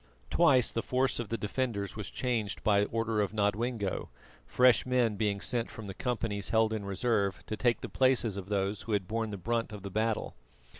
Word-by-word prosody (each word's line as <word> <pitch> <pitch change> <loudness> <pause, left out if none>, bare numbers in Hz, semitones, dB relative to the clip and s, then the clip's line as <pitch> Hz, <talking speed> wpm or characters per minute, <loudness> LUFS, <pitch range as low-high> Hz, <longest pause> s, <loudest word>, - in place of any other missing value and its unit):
Twice 140 -8 +4
the 115 - -1
force 130 +1 0
of 115 -4 -4
the 115 - -1
defenders 105 -1 -2
was 105 -2 -4
changed 115 -5 -2
by 105 -1 +3
order 115 -1 -1
of 100 -1 -1
Nodwengo, 105 0 -1 0.4
fresh 125 -3 +5
men 125 -4 +1
being 100 -1 0
sent 120 +2 +1
from 110 - -9
the 95 - -6
companies 110 -3 -1
held 110 -1 +3
in 110 -2 -3
reserve 100 -2 0
to 110 - -3
take 120 +1 +1
the - - -4
places 130 -5 +2
of 100 -1 -7
those 100 0 -1
who 115 - -4
had 95 -3 0
borne 110 +1 -2
the 100 - -5
brunt 115 +3 -1
of 105 -2 -8
the 100 - -6
battle. 110 +2 -1
110 Hz, 200 wpm, -30 LUFS, 100-120 Hz, 0.4 s, fresh